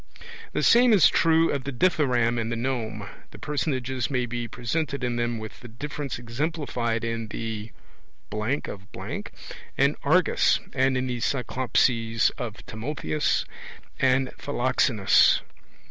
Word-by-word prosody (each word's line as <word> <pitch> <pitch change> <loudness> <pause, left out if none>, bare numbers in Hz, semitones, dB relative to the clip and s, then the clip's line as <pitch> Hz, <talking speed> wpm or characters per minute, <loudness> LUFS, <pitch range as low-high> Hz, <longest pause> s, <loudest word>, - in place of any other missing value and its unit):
The - - 0
same 240 0 +6
is 200 - +7
true 165 0 +3
of 140 -2 -2
the 140 - -4
Dithyramb 125 -6 +2
and 115 +1 -3
the - - -1
Nome: 115 -4 -3 0.2
the - - -13
personages 130 -3 -2
may 125 -3 0
be 120 0 -4
presented 135 +3 -3
in 120 -1 -1
them 120 0 -1
with 110 -1 -8
the 120 - -11
difference 140 +3 -5
exemplified 120 -2 -2
in 115 -1 -3
the... 110 0 -5 0.6
of... 105 -1 -2 1.0
and - - +3
Argas, - - +3
and 130 0 +2
in 130 - -1
the 125 -1 -3
Cyclopses 115 -1 +1
of 115 -3 -6
Timotheus 145 +6 -1 0.5
and 130 0 +3
Philoxenus. 125 -6 +3
125 Hz, 130 wpm, -26 LUFS, 115-140 Hz, 1.0 s, is